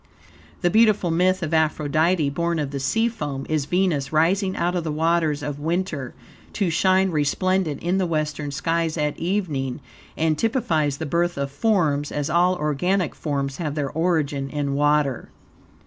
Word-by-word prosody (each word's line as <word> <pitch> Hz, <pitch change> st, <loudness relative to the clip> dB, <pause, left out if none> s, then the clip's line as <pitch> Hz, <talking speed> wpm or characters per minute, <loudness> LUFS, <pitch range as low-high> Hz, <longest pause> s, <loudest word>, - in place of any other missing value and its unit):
The 175 Hz, -2 st, +2 dB
beautiful 215 Hz, -5 st, +4 dB
myth 185 Hz, +2 st, +2 dB
of 160 Hz, 0 st, -3 dB
Aphrodite, 155 Hz, 0 st, +2 dB
born 170 Hz, +3 st, -1 dB
of 145 Hz, -3 st, -2 dB
the 140 Hz, -, -3 dB
sea 225 Hz, -, +1 dB
foam, 145 Hz, -12 st, -4 dB
is 155 Hz, -3 st, 0 dB
Venus 170 Hz, -6 st, 0 dB
rising 185 Hz, +5 st, +2 dB
out 175 Hz, +1 st, 0 dB
of 175 Hz, -, -1 dB
the 160 Hz, -, -2 dB
waters 160 Hz, -1 st, +1 dB
of 145 Hz, -1 st, -4 dB
winter, 160 Hz, -4 st, -2 dB, 0.4 s
to 190 Hz, -5 st, 0 dB
shine 190 Hz, +2 st, +3 dB
resplendent 160 Hz, +1 st, 0 dB
in 180 Hz, +3 st, +1 dB
the 185 Hz, -, +1 dB
western 150 Hz, -2 st, -2 dB
skies 165 Hz, +3 st, -1 dB
at 150 Hz, -1 st, 0 dB
evening, 160 Hz, -8 st, -2 dB, 0.4 s
and 155 Hz, -1 st, +1 dB
typifies 160 Hz, -, 0 dB
the 160 Hz, -, -4 dB
birth 170 Hz, +2 st, 0 dB
of 140 Hz, 0 st, -2 dB
forms, 150 Hz, -4 st, +1 dB
as 145 Hz, +1 st, -2 dB
all 180 Hz, +2 st, +3 dB
organic 175 Hz, +4 st, 0 dB
forms 140 Hz, -3 st, -3 dB
have 150 Hz, -4 st, -3 dB
their 145 Hz, -3 st, -2 dB
origin 150 Hz, -4 st, 0 dB
in 140 Hz, -1 st, -2 dB
water. 145 Hz, -2 st, +1 dB
160 Hz, 165 wpm, -23 LUFS, 145-180 Hz, 0.4 s, beautiful